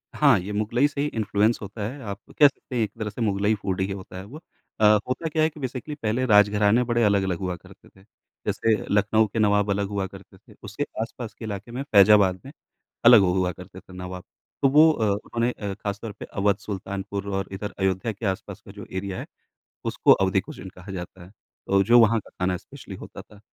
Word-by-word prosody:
हाँ, 140 Hz, -9 st, +5 dB
ये 95 Hz, +3 st, -6 dB
मुग़लई 110 Hz, +7 st, +1 dB
से 140 Hz, -1 st, -4 dB
ही 145 Hz, -, +1 dB
इन्फ्लुएंस 110 Hz, -2 st, +1 dB
होता 105 Hz, +2 st, -8 dB
है। 135 Hz, +3 st, -9 dB
आप 100 Hz, -1 st, -6 dB, 0.2 s
कह 145 Hz, -, +9 dB
सकते 135 Hz, -1 st, -8 dB
हैं 120 Hz, -, +2 dB
एक 105 Hz, -, -3 dB
तरह 110 Hz, -, -2 dB
से 105 Hz, +4 st, -8 dB
मुग़लई 100 Hz, -1 st, +1 dB
फ़ूड 95 Hz, -2 st, -3 dB
ही 95 Hz, +1 st, -1 dB
होता 95 Hz, -1 st, -8 dB
है 95 Hz, -, -7 dB
वो। 130 Hz, +9 st, -10 dB, 0.4 s
अ, 110 Hz, -, +4 dB, 0.2 s
होता 130 Hz, +6 st, -2 dB
क्या 155 Hz, 0 st, +1 dB
है 155 Hz, -, +3 dB
कि 150 Hz, -, -14 dB
बेसिकली 130 Hz, +2 st, -5 dB
पहले 120 Hz, -1 st, -1 dB
राजघराने 105 Hz, +1 st, +4 dB
बड़े 120 Hz, -1 st, +1 dB
अलग-अलग 95 Hz, -4 st, +2 dB
हुआ 90 Hz, -2 st, -3 dB
करते 85 Hz, -, -17 dB
थे। 95 Hz, -, -22 dB, 0.4 s
जैसे 110 Hz, -1 st, +1 dB, 0.2 s
लखनऊ 105 Hz, +2 st, +3 dB
के 110 Hz, +3 st, -4 dB
नवाब 105 Hz, -1 st, +3 dB
अलग 100 Hz, 0 st, 0 dB
हुआ 100 Hz, -1 st, -2 dB
करते 95 Hz, 0 st, -15 dB
थे, 105 Hz, +1 st, -20 dB
उसके 105 Hz, +7 st, -4 dB, 0.2 s
आसपास 115 Hz, -1 st, -6 dB
के 110 Hz, -, -9 dB
इलाके 105 Hz, +1 st, -6 dB
में 125 Hz, +3 st, -4 dB
फ़ैज़ाबाद 100 Hz, -6 st, +5 dB
में 135 Hz, -, -9 dB, 0.5 s
अलग 120 Hz, -2 st, +9 dB
हु 90 Hz, -2 st, +2 dB
हुआ 90 Hz, -1 st, +1 dB
करते 90 Hz, +1 st, -12 dB
थे 95 Hz, 0 st, -17 dB
नवाब। 90 Hz, 0 st, -7 dB, 0.4 s
तो 135 Hz, -, +5 dB
वो 155 Hz, +3 st, +7 dB
अ, 115 Hz, -8 st, -1 dB
उन्होंने 115 Hz, +4 st, -1 dB
अ, 100 Hz, -4 st, -5 dB
ख़ास 100 Hz, 0 st, -5 dB
तौर 115 Hz, -, -5 dB
पर 100 Hz, -, -10 dB
अवध, 100 Hz, 0 st, 0 dB
सुल्तानपुर 100 Hz, 0 st, -5 dB
और 95 Hz, -, -2 dB
इधर 100 Hz, +2 st, -5 dB
अयोध्या 95 Hz, +3 st, 0 dB
के 110 Hz, +2 st, -8 dB
आसपास 95 Hz, -2 st, -4 dB
का -, -, -13 dB
जो -, -, -10 dB
एरिया 95 Hz, 0 st, -4 dB
है -, -, -6 dB, 0.6 s
उसको -, -, +3 dB
अवधी 95 Hz, 0 st, +2 dB
कुज़ीन 95 Hz, +1 st, -10 dB
कहा 90 Hz, +2 st, -11 dB
जाता 90 Hz, 0 st, -8 dB
है, 90 Hz, -, -14 dB, 0.4 s
अ, 100 Hz, 0 st, +5 dB
जो 120 Hz, +5 st, +6 dB
वहाँ 115 Hz, 0 st, +5 dB
का 100 Hz, -, -15 dB
खाना 90 Hz, 0 st, 0 dB
स्पेशली -, -, -11 dB
होता -, -, -10 dB
था। 105 Hz, -, -18 dB
105 Hz, 225 wpm, -24 LUFS, 95-115 Hz, 0.6 s, कह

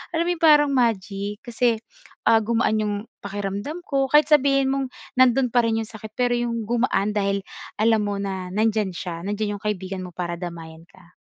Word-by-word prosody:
alam 335 Hz, -, +1 dB
'yong 345 Hz, -, -3 dB
parang 295 Hz, -2 st, +6 dB
magic 210 Hz, -3 st, -1 dB
kasi, 235 Hz, -1 st, +1 dB, 0.5 s
ah, 225 Hz, -1 st, +6 dB
gumaan 225 Hz, -1 st, +1 dB
'yong 210 Hz, -1 st, -1 dB, 0.3 s
pakiramdam 205 Hz, -, -4 dB
ko 275 Hz, -1 st, +1 dB
kahit 300 Hz, +1 st, +5 dB
sabihin 275 Hz, -2 st, +4 dB
mong 270 Hz, -1 st, -1 dB, 0.3 s
nandoon 255 Hz, 0 st, +5 dB
pa 240 Hz, -1 st, +4 dB
rin 225 Hz, -, +1 dB
'yong 220 Hz, -, -7 dB
sakit, 220 Hz, -1 st, -10 dB
pero 245 Hz, -1 st, +2 dB
'yong 235 Hz, -2 st, -2 dB
gumaan 230 Hz, -3 st, +1 dB
dahil 200 Hz, -1 st, 0 dB, 0.4 s
alam 220 Hz, +1 st, +3 dB
mo 205 Hz, 0 st, -2 dB
na 190 Hz, -2 st, -4 dB
nandiyan 215 Hz, -2 st, +1 dB
siya, 170 Hz, -2 st, -5 dB
nandiyan 205 Hz, 0 st, -2 dB
'yong -, -, -26 dB
kaibigan 190 Hz, -2 st, -3 dB
mo 175 Hz, -, -13 dB
para 175 Hz, -1 st, -3 dB
damayan 165 Hz, -2 st, -8 dB
ka. 180 Hz, -1 st, -21 dB
215 Hz, 180 wpm, -23 LUFS, 195-245 Hz, 0.5 s, parang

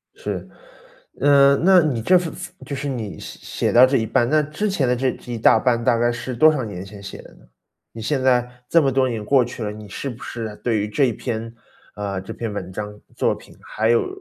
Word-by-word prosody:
是。 -, -, -5 dB, 0.7 s
呃， 140 Hz, -1 st, +6 dB
那 185 Hz, +3 st, +6 dB
你 135 Hz, -7 st, -1 dB
这 185 Hz, +11 st, +5 dB, 0.5 s
就 140 Hz, -, -5 dB
是 140 Hz, +1 st, -3 dB
你 115 Hz, -7 st, -5 dB
写 -, -, -9 dB, 0.3 s
写 -, -, +2 dB
到 125 Hz, +2 st, +8 dB
这 135 Hz, +1 st, +2 dB
一 110 Hz, -, 0 dB
半， 120 Hz, +1 st, +1 dB
那 155 Hz, +1 st, +4 dB
之 150 Hz, +8 st, -3 dB
前 150 Hz, -10 st, 0 dB
的 125 Hz, -, +2 dB
这 130 Hz, +1 st, 0 dB
这 120 Hz, -, -10 dB
一 115 Hz, -, -3 dB
大 110 Hz, 0 st, +5 dB
半 120 Hz, -1 st, +1 dB
大 115 Hz, -, +3 dB
概 120 Hz, +1 st, +2 dB
是 120 Hz, +1 st, -5 dB
多 155 Hz, +6 st, +6 dB
少 145 Hz, -5 st, -2 dB
年 95 Hz, -3 st, -6 dB
前 100 Hz, 0 st, -11 dB
写 100 Hz, -, -9 dB
的 -, -, -16 dB
呢？ -, -, -21 dB, 0.5 s
你 115 Hz, -, -9 dB
现 130 Hz, +3 st, -1 dB
在， 125 Hz, -1 st, +1 dB
这 165 Hz, +4 st, +4 dB
么 135 Hz, -, +2 dB
多 130 Hz, 0 st, +2 dB
年 115 Hz, -4 st, -3 dB
过 130 Hz, +3 st, +3 dB
去 120 Hz, -1 st, -7 dB
了， 105 Hz, -, -3 dB
你 105 Hz, 0 st, -10 dB
是 135 Hz, +7 st, -5 dB
不 120 Hz, 0 st, -9 dB
是 110 Hz, -3 st, -6 dB
对 115 Hz, -3 st, +1 dB
于 105 Hz, -, -1 dB
这 135 Hz, +6 st, +2 dB
一 120 Hz, -, 0 dB
篇 115 Hz, 0 st, -5 dB, 0.4 s
啊， 100 Hz, -1 st, -4 dB
这 95 Hz, -, -8 dB
篇 115 Hz, -2 st, -4 dB
文 95 Hz, -3 st, -6 dB
章、 105 Hz, +1 st, -6 dB, 0.2 s
作 -, -, +1 dB
品， -, -, -16 dB
还 110 Hz, +1 st, -1 dB
有 120 Hz, -, +3 dB
120 Hz, 260 characters per minute, -21 LUFS, 110-135 Hz, 0.7 s, 到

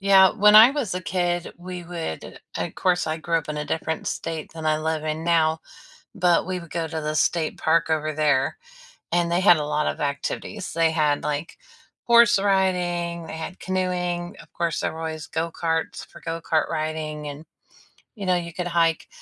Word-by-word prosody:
Yeah. 195 Hz, -1 st, +6 dB
When 210 Hz, 0 st, +5 dB
I 225 Hz, +4 st, +10 dB
was 270 Hz, -10 st, -2 dB
a 180 Hz, -, -2 dB
kid, 175 Hz, -1 st, -1 dB
we 180 Hz, 0 st, -7 dB
would 165 Hz, -, -6 dB, 0.2 s
of -, -, -3 dB
course, 180 Hz, -2 st, +1 dB
I 155 Hz, -, -1 dB
grew 165 Hz, +1 st, 0 dB
up 155 Hz, -, -9 dB
in 150 Hz, -, -3 dB
a 150 Hz, -, -2 dB
different 160 Hz, +1 st, -3 dB
state 160 Hz, -2 st, -4 dB
than 160 Hz, -1 st, -6 dB
I 155 Hz, 0 st, +2 dB
live 155 Hz, 0 st, -2 dB
in 155 Hz, +1 st, -3 dB
now, 160 Hz, -2 st, +2 dB, 0.5 s
but 180 Hz, -4 st, +2 dB
we 185 Hz, -1 st, -2 dB
would 170 Hz, -, -13 dB
go 165 Hz, -1 st, -2 dB
to 160 Hz, 0 st, -4 dB
the 155 Hz, 0 st, -3 dB
state 160 Hz, +1 st, +1 dB
park 160 Hz, 0 st, +2 dB
over 155 Hz, -1 st, 0 dB
there, 145 Hz, -3 st, +1 dB, 0.6 s
and 170 Hz, 0 st, +1 dB
they 175 Hz, -, +2 dB
had 180 Hz, -3 st, +6 dB
a 150 Hz, -, -2 dB
lot 150 Hz, 0 st, 0 dB
of -, -, -2 dB
activities. 150 Hz, +7 st, -3 dB
They 165 Hz, -1 st, +3 dB
had, 150 Hz, -3 st, +1 dB
like, 150 Hz, +2 st, -3 dB, 0.5 s
horse 235 Hz, -2 st, +6 dB
riding, 180 Hz, -3 st, 0 dB
they -, -, -7 dB
had 160 Hz, +3 st, -6 dB
canoeing, 180 Hz, -2 st, -2 dB
of -, -, -19 dB
course, 170 Hz, -2 st, -1 dB
there -, -, -1 dB
were 160 Hz, -, -8 dB
always 160 Hz, -1 st, -5 dB
go 165 Hz, +1 st, -2 dB
karts 165 Hz, -1 st, -2 dB
for -, -, -15 dB
go 165 Hz, 0 st, -4 dB
kart 160 Hz, -1 st, 0 dB
riding 155 Hz, -1 st, -3 dB
and, 145 Hz, +2 st, -8 dB, 0.7 s
you 200 Hz, -, -6 dB
know, 185 Hz, -1 st, +3 dB
you 170 Hz, -1 st, -4 dB
could 180 Hz, +1 st, -3 dB
hike. 165 Hz, -2 st, +1 dB
165 Hz, 200 wpm, -24 LUFS, 155-180 Hz, 0.7 s, I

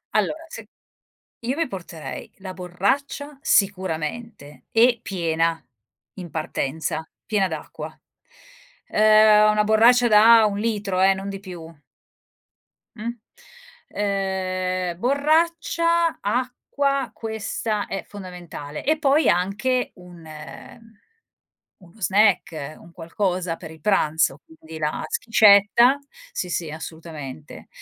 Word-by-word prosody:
Allora, 320 Hz, +1 st, 0 dB
se -, -, -10 dB, 0.7 s
io 255 Hz, +5 st, -3 dB
mi 330 Hz, -, 0 dB
porterei 175 Hz, -6 st, -8 dB
la 190 Hz, -1 st, -7 dB
borraccia, 200 Hz, +11 st, -2 dB
sicuramente, 185 Hz, -, -1 dB
e 235 Hz, +1 st, +4 dB
piena 165 Hz, -4 st, -1 dB, 0.6 s
in 175 Hz, -2 st, -7 dB
partenza. 155 Hz, 0 st, -3 dB, 0.2 s
Piena 200 Hz, -3 st, +1 dB
d'acqua. 160 Hz, -3 st, -7 dB, 1.0 s
Ehm, 215 Hz, 0 st, +6 dB
una 210 Hz, 0 st, +2 dB
borraccia 235 Hz, +3 st, +5 dB
da 220 Hz, +1 st, +7 dB
1 205 Hz, -1 st, -1 dB
litro 205 Hz, -4 st, -1 dB
eh, 195 Hz, 0 st, +5 dB
non 195 Hz, +1 st, -6 dB
di 195 Hz, 0 st, -6 dB
più! 170 Hz, -4 st, -10 dB, 1.2 s
Mh, 220 Hz, +2 st, -6 dB, 0.8 s
ehm, 185 Hz, -3 st, -2 dB
borraccia, 330 Hz, +5 st, +1 dB
acqua, 255 Hz, +4 st, -1 dB
questa 220 Hz, -1 st, -3 dB
è 195 Hz, -, -4 dB
fondamentale, 175 Hz, -7 st, -8 dB
e 310 Hz, +2 st, +2 dB
poi 290 Hz, +1 st, +3 dB
anche 215 Hz, +8 st, 0 dB
un 175 Hz, -2 st, -14 dB, 1.6 s
uno 175 Hz, +5 st, -19 dB
snack, 180 Hz, -6 st, +1 dB
un 170 Hz, 0 st, -17 dB
qualcosa 180 Hz, 0 st, -2 dB
per 160 Hz, -, -10 dB
i 160 Hz, -2 st, -14 dB
pranzo 155 Hz, -7 st, +1 dB
quindi 160 Hz, 0 st, -12 dB
la 150 Hz, 0 st, -2 dB
schiscetta, 220 Hz, +4 st, +5 dB, 0.3 s
sì 180 Hz, -, -4 dB
sì 165 Hz, -3 st, -3 dB
assolutamente, 155 Hz, -, -9 dB
195 Hz, 105 wpm, -23 LUFS, 170-230 Hz, 1.6 s, da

